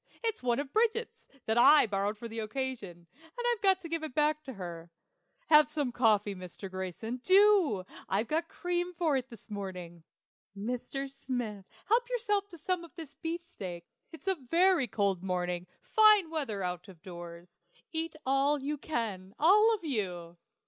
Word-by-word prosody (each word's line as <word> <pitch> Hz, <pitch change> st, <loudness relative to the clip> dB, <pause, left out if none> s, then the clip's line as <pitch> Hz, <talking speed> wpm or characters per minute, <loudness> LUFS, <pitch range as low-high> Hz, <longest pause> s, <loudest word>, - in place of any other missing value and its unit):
It's 450 Hz, -1 st, -1 dB
one 240 Hz, -1 st, +1 dB
of 280 Hz, -1 st, -4 dB
Bridget's, 455 Hz, +1 st, 0 dB, 0.2 s
that 220 Hz, +2 st, +2 dB
I 295 Hz, +4 st, +8 dB
borrowed 205 Hz, 0 st, -1 dB
for 235 Hz, -, -7 dB
the 225 Hz, 0 st, -6 dB
occasion, 215 Hz, -7 st, -4 dB, 0.3 s
and 485 Hz, -, -3 dB
I've 440 Hz, -, -7 dB
got 385 Hz, -2 st, +4 dB
to 335 Hz, -, -7 dB
give 330 Hz, 0 st, -2 dB
it 310 Hz, -5 st, -6 dB
back 300 Hz, 0 st, +2 dB
to 265 Hz, -, -6 dB
her. 175 Hz, -4 st, -8 dB, 0.6 s
Have 300 Hz, -1 st, +7 dB
some 295 Hz, -4 st, -1 dB
coffee, 215 Hz, -4 st, +2 dB
Mr. 185 Hz, +1 st, -9 dB
Grayson 190 Hz, +6 st, -4 dB
do! 370 Hz, -, +4 dB, 0.2 s
I've 205 Hz, +4 st, 0 dB
got 325 Hz, +2 st, 0 dB
cream 355 Hz, 0 st, -2 dB
for 320 Hz, -4 st, +1 dB
it 260 Hz, -1 st, -2 dB
this 230 Hz, -2 st, -14 dB
morning. 180 Hz, -4 st, -6 dB, 0.5 s
Mr. 250 Hz, +5 st, -3 dB
Smith, 245 Hz, -7 st, -5 dB, 0.2 s
help 480 Hz, +3 st, +2 dB
yourself 415 Hz, -5 st, 0 dB
to 345 Hz, -, -12 dB
some 350 Hz, +2 st, -2 dB
of 340 Hz, -, -14 dB
the 315 Hz, -4 st, -9 dB
beefsteak. 325 Hz, -, -5 dB, 0.3 s
It's 325 Hz, +3 st, -13 dB
a 385 Hz, -, +4 dB, 0.2 s
very 350 Hz, -5 st, +4 dB
cold 200 Hz, -4 st, 0 dB
morning 180 Hz, -1 st, -2 dB, 0.2 s
fine 425 Hz, -6 st, +5 dB
weather 230 Hz, -12 st, -2 dB
out 180 Hz, +1 st, -4 dB
of 180 Hz, -5 st, -15 dB
doors. 175 Hz, -1 st, -10 dB, 0.3 s
Eat 325 Hz, 0 st, -3 dB
all 275 Hz, +2 st, +2 dB
you 290 Hz, +2 st, -3 dB
can, 210 Hz, -10 st, -4 dB
all 420 Hz, +8 st, +6 dB
of 405 Hz, -, -12 dB
you. 180 Hz, -, -3 dB
260 Hz, 170 wpm, -31 LUFS, -, 0.6 s, I